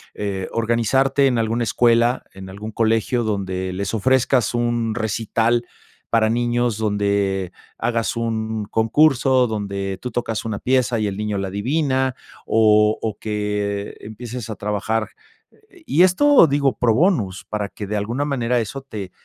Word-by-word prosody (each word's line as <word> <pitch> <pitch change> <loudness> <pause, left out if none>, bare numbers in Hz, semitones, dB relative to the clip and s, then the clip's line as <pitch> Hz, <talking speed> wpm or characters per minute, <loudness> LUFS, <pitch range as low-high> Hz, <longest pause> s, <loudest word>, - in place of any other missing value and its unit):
eh, 100 -2 -3
organizarte 125 +5 +2
en 125 -3 +1
alguna 115 +1 0
escuela, 120 +2 +2
en 95 0 -10
algún 105 +3 -7
colegio 115 +2 +1
donde 95 -3 -2
les 100 +2 -3
ofrezcas 125 +1 +2
un 120 -2 0
recital, 115 +1 0 0.4
para 110 -1 +3
niños, 120 -1 0
donde 100 -3 0 0.3
hagas 115 -1 -1
un 110 -2 -2
concurso, 130 +3 +3
donde 100 -3 -3
tú 125 - -4
tocas 115 -2 -3
una 110 -3 -3
pieza 125 -1 +1
y 110 - 0
el 100 -1 -2
niño 105 -1 -2
la 95 -1 -3
adivina, 130 +5 0 0.3
o 105 -1 +4
o 110 -3 -3
que 105 -1 -3
empieces 115 +1 -7
a 110 - -4
trabajar. 105 +2 -2 0.8
Y 165 - +2
esto 190 - +6
digo, 140 -2 +1
pro 115 -3 +3
bonus 120 - +1
para 105 -1 -3
que 105 - -7
de 105 - -3
alguna 120 +8 -2
manera 125 -4 0
eso 115 +5 -4
te 105 -8 -7
110 Hz, 145 wpm, -21 LUFS, 105-120 Hz, 0.8 s, esto